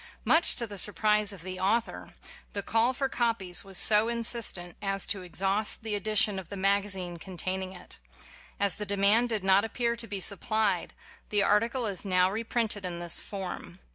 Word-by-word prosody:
Much 325 +2 +5
to 235 - +1
the 205 -3 -7
surprise 210 +1 +2
of 190 -5 -10
the 185 0 -6
author, 225 +5 -2 0.4
the 200 - -3
call 225 +4 +2
for 270 +1 -2
copies 230 -8 0
was 195 -2 0
so 215 +1 +4
insistent 230 -6 -1
as 195 -1 -2
to 200 - -2
exhaust 195 +5 -2
the 220 -1 -3
edition 205 -1 +1
of 180 -3 -11
the 200 - -7
magazine 195 -2 0
contain 185 +2 -4
ing 190 0 -7
it. 180 - -9 0.6
As 200 -2 +1
the 210 - -5
demand 200 +5 +3
did 215 -4 -2
not 190 +1 +4
appear 235 +1 -1
to 230 -1 -6
be 200 -2 -3
supplied, 205 +3 +1 0.3
the 205 -1 +2
article 230 +5 +1
is 200 -4 -3
now 185 -1 +2
re 220 +3 -3
printed 225 -3 -1
in 180 -2 -4
this 175 -1 +3
form. 185 -3 -7
200 Hz, 185 wpm, -28 LUFS, 190-220 Hz, 0.6 s, Much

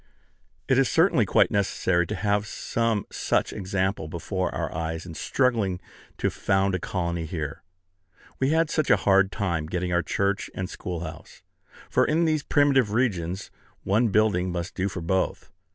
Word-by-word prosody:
It 130 - +4
is 135 - +3
certainly 160 - +3
quite - - +4
necessary 95 -4 +1
to - - -3
have 105 +2 0
some 115 -2 -1
such - - 0
example 95 -3 -1
before 90 +3 -3
our - - -3
eyes 80 +1 -3
in 85 - -8
struggling 110 - 0 0.4
to - - 0
found 95 0 +1
a 95 - 0
colony 85 -2 -2
here. 75 -4 -5 0.8
We 130 - +2
had 160 +1 +2
such 155 -3 0
a - - +6
hard 95 -1 +4
time 85 -6 -2
getting 90 +1 -2
our 85 - +3
church 100 +2 -1
and 95 - -3
schoolhouse! 85 -3 -7 0.4
for - - +2
in 165 +2 +2
these 155 -2 +1
primitive 140 -7 +3
regions 95 -6 -1 0.3
one 110 +5 +2
building 100 -4 +2
must 85 0 -4
do 95 +1 -1
for 90 - -6
both. 95 +3 -1
95 Hz, 160 wpm, -26 LUFS, 90-110 Hz, 0.8 s, a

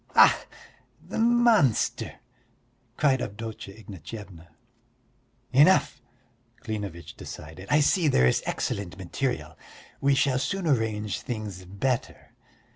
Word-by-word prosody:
"Ach, - - +8 0.7
the - - -6
monster!" 230 - +3 0.8
cried 135 -4 +3
Avdotya 105 -1 -6
Ignatyevna. 95 -3 -10 1.1
"Enough!" 150 +8 +5 0.6
Klinevitch 100 -7 -5
decided. 80 +6 -9
"I 150 - +4
see 165 +3 +3
there 65 - +4
is 65 - +3
excellent 95 -3 -3
material. 95 - -3 0.4
We 140 0 +3
shall 135 -1 +2
soon 190 +7 -2
arrange 110 - 0
things 105 -6 -6
better. 115 +7 -3
110 Hz, 100 wpm, -27 LUFS, 95-140 Hz, 1.1 s, Ach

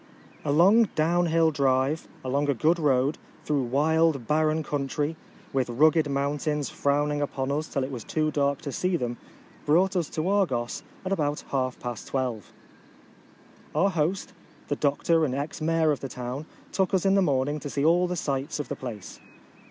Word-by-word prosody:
A 145 - 0
long 195 +10 +6
down 170 +3 +2
hill 165 0 +3
drive, 135 +1 +1 0.2
along 140 +3 0
a 140 - +2
good 160 +9 +2
road, 140 -1 +2 0.3
through 145 -2 +1
wild 150 +1 +2
barren 155 +3 +1
country, 145 +2 -2 0.4
with 130 -2 0
rugged 155 +5 +3
mountains 145 +1 -1
frowning 145 +1 0
upon 135 -1 -2
us 155 +3 -1
till 140 - -2
it 130 - -4
was 120 -4 -6
too 155 -1 0
dark 140 -1 0
to 140 - -4
see 180 +7 0
them, 120 -4 -3 0.5
brought 185 +6 +3
us 170 -4 0
to 160 +2 -2
Argos, 155 -13 0 0.2
at 185 - -2
about 150 -6 0
half 130 -2 -1
past 120 -4 -6
twelve. 125 -6 -3 1.2
Our 195 +1 +3
host, 175 +3 -1 0.4
the 145 - +1
doctor 160 +3 +2
and 130 -4 0
ex 145 +3 -4
mayor 160 0 +2
of 145 - -1
the 135 - -6
town, 125 +5 -5 0.2
took 190 0 +1
us 190 - 0
in 195 - +4
the 195 - +4
morning 145 -2 +1
to 145 - -6
see 140 +1 -1
all 175 +3 +4
the 180 - -2
sights 145 -1 -2
of 150 - -4
the 145 - -2
place. 115 -8 -8
145 Hz, 180 wpm, -26 LUFS, 135-160 Hz, 1.2 s, long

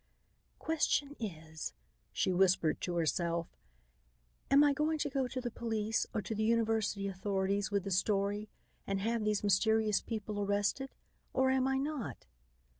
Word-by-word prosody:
"Question 295 -2 0
is," 160 -7 -5 0.4
she 185 - +1
whispered 180 -3 +3
to 175 - -2
herself, 170 0 0 0.9
"am 280 +1 +7
I 290 -1 +5
going 305 +3 +1
to 290 -1 -2
go 270 -2 0
to 255 +1 -4
the 245 -1 -3
police 225 -1 -1
or 210 - -2
to 220 - -3
the 215 - -2
university 220 -3 +1
authorities 195 +1 -1
with 200 -2 0
the 195 - -4
story 200 +2 +1 0.4
and 195 0 0
have 225 +2 0
these 210 -1 0
mysterious 215 +1 +3
people 215 -2 -4
arrested, 205 +7 0 0.4
or 260 0 +3
am 265 0 +2
I 270 0 +1
not?" 280 -3 -3
210 Hz, 150 wpm, -33 LUFS, 195-250 Hz, 0.9 s, am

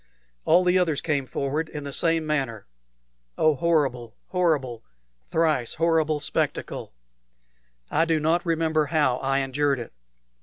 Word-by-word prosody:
All 180 - +5
the 180 +1 +3
others 160 -5 +1
came 140 -4 -1
forward 140 +5 -2
in 150 - -6
the 140 -1 -6
same 165 0 +1
manner. 135 -8 -2 0.7
Oh, 155 -1 +4
horrible, 135 -7 0
horrible, 150 -10 0 0.5
thrice 155 -7 +1
horrible 160 -2 +1
spectacle! 140 - -3 1.0
I 165 - +3
do 165 -1 +1
not 160 +3 +1
remember 160 -2 +1
how 145 -6 +2
I 135 +1 0
endured 140 +1 0
it. 120 - -8
150 Hz, 130 wpm, -25 LUFS, 135-165 Hz, 1.0 s, All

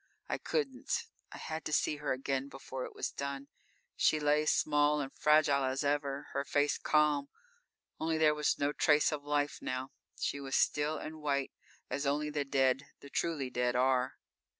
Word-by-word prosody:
I - - -2
couldn't. 275 - -1 0.3
I - - -8
had 160 0 -5
to - - -3
see 150 0 +1
her 150 -1 -2
again 135 +1 -2
before 130 -1 -6
it - - -10
was - - -2
done. 140 0 -5 0.5
She 155 - +3
lay, 150 +1 +2
small 150 0 +3
and 135 -2 -4
fragile 150 -2 +4
as 130 +2 -1
ever, 140 -1 -1
her 140 - 0
face 145 +1 +1
calm, 150 -2 +2 0.7
only 160 0 0
there 155 -1 +5
was 150 -1 +1
no 145 0 0
trace 150 0 +4
of 150 -2 -3
life 145 0 0
now. 130 +1 -3 0.3
She 140 - -1
was 135 -1 -3
still 150 +1 +2
and 155 0 -7
white, 140 -2 0 0.4
as 140 0 -2
only 150 +2 0
the 145 -1 -1
dead 135 0 +2
the 140 - -12
truly 145 -7 -1
dead 125 0 0
are. 130 0 +2
145 Hz, 175 wpm, -33 LUFS, 135-150 Hz, 0.7 s, there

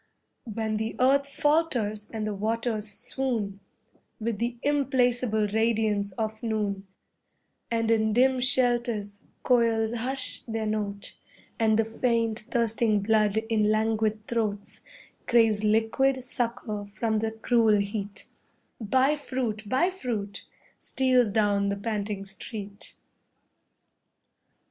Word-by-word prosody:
When 220 0 -2
the 220 +1 -3
earth 275 +2 +4
falters 270 -9 0
and 220 -1 -3
the 215 - -2
waters 220 +1 -2
swoon 225 -2 -2 0.6
With 220 -2 -2
the 240 +1 -2
implacable 250 -6 +2
radiance 215 -1 +1
of 220 +2 -3
noon, 205 -3 -2 0.8
And 230 -1 +1
in 220 -1 +3
dim 260 +2 +4
shelters 240 -5 +1 0.2
koils 230 -2 +2
hush 260 +3 0
their 225 -1 -2
notes, 205 -2 -3 0.5
And 220 -1 +3
the 225 - +2
faint, 230 -1 0
thirsting 225 -3 +1
blood 215 -1 +2
in 220 -2 +2
languid 215 0 +1
throats 215 -4 -3 0.5
Craves 225 -3 +4
liquid 225 +5 +2
succour 235 -4 -3
from 215 +2 -1
the 225 +1 0
cruel 225 -1 +3
heat, 200 0 -3 0.5
BUY 260 +6 +2
FRUIT, 235 -7 -3
BUY 310 - +2
FRUIT, 220 - -4 0.3
steals 255 -3 +2
down 200 -1 +2
the 200 - -1
panting 205 -2 -3
street. 200 +1 -5
220 Hz, 110 wpm, -27 LUFS, 210-240 Hz, 0.8 s, earth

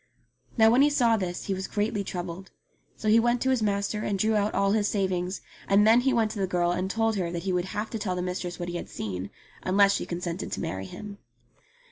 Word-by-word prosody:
Now 220 0 +6
when 250 +3 +5
he 290 - +6
saw 240 -6 +3
this 180 -4 -3
he 195 - -1
was 190 0 -4
greatly 205 0 -1
troubled. 180 0 -6 0.5
So 215 - -4
he 220 +2 +6
went 240 +1 +2
to 265 - +2
his 255 -3 +1
master 205 0 0
and 205 -2 -1
drew 220 +3 +2
out 210 0 +1
all 195 0 +2
his 210 -1 +2
savings; 185 -2 -1 0.3
and 200 +1 +5
then 225 +2 +6
he 265 +1 +2
went 225 -3 +2
to 215 - -6
the 190 - +1
girl 175 -1 +1
and 185 +2 -1
told 225 +1 +1
her 175 -3 -1
that 170 0 -4
he 190 -1 -1
would 180 0 0
have 210 +3 -4
to 225 - -3
tell 190 -3 -2
the 180 - -2
mistress 180 -1 -4
what 175 -1 -4
he 175 - -3
had - - -7
seen, 95 -2 -5 0.3
unless 200 +1 +4
she - - -2
consented 175 +1 -4
to - - -3
marry 95 +1 -4
him. 205 - -9
200 Hz, 245 wpm, -27 LUFS, 180-220 Hz, 0.5 s, Now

